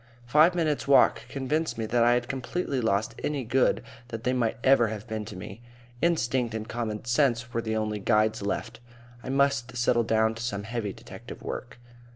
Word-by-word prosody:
Five 155 +8 +5
minutes' 155 -5 0
walk 140 - +4
convinced 150 +3 -1
me 110 - -2
that 120 +2 +2
I 120 +1 +5
had 120 0 0
completely 135 +2 -2
lost 110 0 0
any 145 -3 -1
good 125 +3 +2 0.2
that 115 -2 -6
they 125 - +1
might 120 -1 0
ever 130 -3 +5
have 110 -1 -6
been 110 -1 -4
to 105 - -9
me. 105 +4 -9 0.4
Instinct 125 -8 +1
and 110 0 -4
common 115 -2 -4
sense 120 -2 +1
were 115 - 0
the 110 -1 -2
only 110 -1 -2
guides 110 +1 +2
left. 100 +2 -3 0.4
I 130 - -7
must 135 -2 +1
settle 120 -1 +3
down 110 0 +2
to 115 - -8
some 100 -4 -3
heavy 115 -2 -3
detective - - -11
work. 125 - -6
120 Hz, 190 wpm, -27 LUFS, 110-130 Hz, 0.4 s, Five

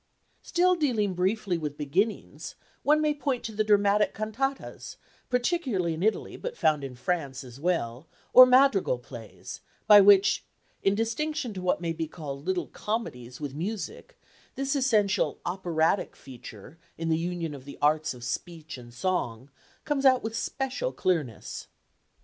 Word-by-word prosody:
Still 360 +1 +2
dealing 240 - +1
briefly 185 0 0
with 150 -2 -5
beginnings, 180 +10 -2 0.3
one 300 +1 +3
may 305 -1 +2
point 280 -4 -2
to 225 - -4
the 215 0 0
dramatic 205 0 +3
cantatas 230 +6 -4 0.3
particularly 250 - 0
in 160 - -5
Italy, 215 +3 0
but 485 -1 -6
found 150 -2 +2
in 135 -2 -6
France 140 -1 -2
as 125 0 -12
well 155 -5 -1 0.3
or 255 0 +11
madrigal 250 - +4
plays, 120 -2 -10 0.2
by 205 -1 +9
which, 200 0 +5 0.4
in 195 +1 +2
distinction 245 +4 -2
to 185 - -6
what 180 -1 0
may 165 -1 -1
be 160 0 -3
called 145 -1 -8
little 185 -1 0
comedies 125 - -5
with 145 -3 -5
music, 190 +8 -5 0.4
this 275 +1 -1
essential 220 -7 +2
"operatic" 175 -1 0
feature 125 +2 -12 0.2
in 165 0 -3
the 160 - +3
union 170 -2 -3
of 135 -2 -10
the 140 - -10
arts 150 -1 +2
of 120 - -12
speech 160 +4 -5
and 120 -1 -13
song, 130 -6 -2 0.3
comes 290 -2 0
out 260 -2 +5
with 220 0 -4
special 270 - -2
clearness. 155 -11 -2
185 Hz, 150 wpm, -27 LUFS, 150-230 Hz, 0.4 s, or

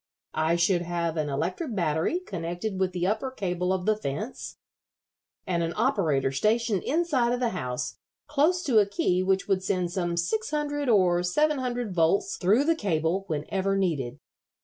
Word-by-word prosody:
I 160 +2 +1
should 175 +1 +2
have 170 -1 -2
an 155 -2 -1
electric 180 - -2
battery 165 - 0
connected 185 - -4
with 190 -1 +1
the 180 -1 -2
upper 220 +7 0
cable 180 -7 -2
of 185 -1 -1
the 215 - +3
fence, 210 - -5 0.9
and 175 -3 0
an 165 0 -1
operator 165 - +1
stationed 215 - +1
inside 285 -6 +1
of 245 - -1
the 245 -2 +1
house, 125 - -4 0.3
close 320 +5 +2
to 250 -9 +4
a 205 - +3
key 185 -2 +1
which 190 +1 +1
would 195 -2 +1
send 180 -3 -1
some 175 -2 -2
six 215 +6 -1
hundred 290 -2 -1
or 180 -5 +4
seven 300 +12 +1
hundred 245 -5 -2
volts 175 +3 +2
through 205 +9 +3
the 330 +3 +3
cable 190 - -1
whenever 190 +6 -1
needed. 150 -11 -1
190 Hz, 170 wpm, -27 LUFS, 170-235 Hz, 0.9 s, to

